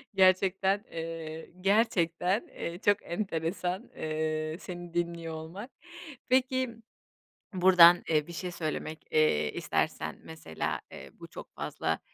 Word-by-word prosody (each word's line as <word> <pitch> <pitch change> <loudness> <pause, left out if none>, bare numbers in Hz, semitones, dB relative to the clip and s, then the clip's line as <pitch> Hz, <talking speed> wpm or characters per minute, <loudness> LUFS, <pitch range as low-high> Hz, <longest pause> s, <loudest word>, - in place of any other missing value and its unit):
Gerçekten, 190 +2 +3
eee, 160 -1 -6
gerçekten, 195 -1 +2
eee, 170 +2 -6
çok 205 0 +5
enteresan, 175 0 -2
eee, 155 0 -2
seni 175 -2 -8
dinliyor 170 -1 -2
olmak. 170 - -8 0.6
Peki 260 0 +2 0.9
buradan, 180 -1 +8
eee, 155 -1 +2
bir 170 - -9
şey 180 +2 -4
söylemek, 155 -1 -4
eee, 115 - +3
istersen - - -2
mesela, 160 - -4
eee, - - -10
bu - - -9
çok - - -11
fazla, - - -2
170 Hz, 115 wpm, -30 LUFS, 160-190 Hz, 0.9 s, buradan